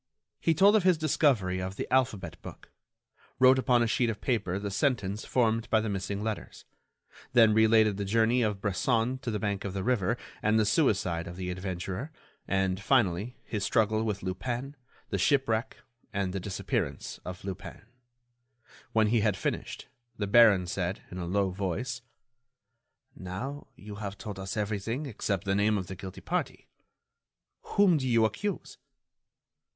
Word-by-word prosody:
He 165 - +2
told 200 +6 +6
of 215 - +5
his 185 -2 +4
discovery 130 - +2
of 95 +1 -4
the - - -3
alphabet 130 -6 0
book, - - -11 0.7
wrote 130 +1 +6
upon 125 -1 +3
a - - +1
sheet 120 +1 +1
of 110 - -3
paper 105 -8 -1
the 100 0 -4
sentence 105 -4 0
formed 115 -2 +1
by 110 - +4
the 110 0 -2
missing 100 +1 -3
letters, 110 -1 -5 0.7
then 115 -3 +6
related 110 -2 +4
the 100 - -2
journey 115 +4 +2
of 105 -3 0
Bresson 115 +5 0
to 130 -2 -5
the 105 - -1
bank 100 -2 -2
of 100 - -4
the 95 - -2
river 115 -1 +1 0.2
and 110 +1 +3
the 110 - +3
suicide 100 - +1
of 85 - -7
the 90 0 -4
adventurer, 95 - -4 0.4
and, 95 0 0
finally, 110 -2 +1
his 105 -3 -4
struggle 110 -1 +2
with 105 -4 -2
Lupin, 120 +9 -4 0.4
the 100 - 0
shipwreck, 115 0 +1 0.3
and 95 -2 -2
the 95 - -2
disappearance 95 +1 -3
of 90 +1 -8
Lupin. 95 +1 -7 1.1
When 110 -1 +4
he 115 +2 +2
had 105 -2 +1
finished, - - -4 0.3
the 105 - -1
baron 100 -3 +6
said, 90 0 -3
in 90 - -6
a 85 - -4
low 95 +1 +1
voice: 100 +7 -3 1.1
"Now, 120 +11 -6
you 105 0 -10
have 100 -2 -5
told 100 -3 -7
us 95 +2 -5
everything 105 +6 -2
except 100 -7 -2
the 95 - 0
name 105 +2 +2
of 95 - -3
the 95 +2 -7
guilty 95 0 -9
party. - - -3 0.9
Whom 195 -5 +3
do 130 - -2
you 115 -2 +4
accuse?" 200 - -3
105 Hz, 165 wpm, -29 LUFS, 95-120 Hz, 1.1 s, told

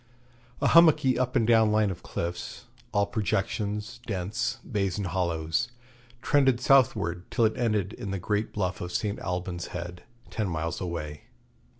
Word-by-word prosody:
A - - +3
hummocky 155 -6 +6
up 125 -1 0
and 115 - +3
down 110 -1 +5
line 105 -2 +3
of 90 - -7
cliffs, 85 +1 -5 0.3
all 100 0 +2
projections, 105 +2 -2
dents, 105 +4 -2
bays, 100 -5 -1
and 100 - -2
hollows, 85 +3 0 0.6
trended 135 -4 +3
southward 105 -10 +3
till 115 - +2
it 110 - +1
ended 105 -5 0
in 100 - -6
the 100 - -2
great 105 +3 -1
bluff 95 -3 -2
of 90 - -4
St. 105 +2 -1
Alban's 90 -1 -3
Head, 90 0 -7 0.3
ten 110 -4 -1
miles 85 0 -3
away. 75 -5 -5
100 Hz, 155 wpm, -27 LUFS, 90-115 Hz, 0.6 s, hummocky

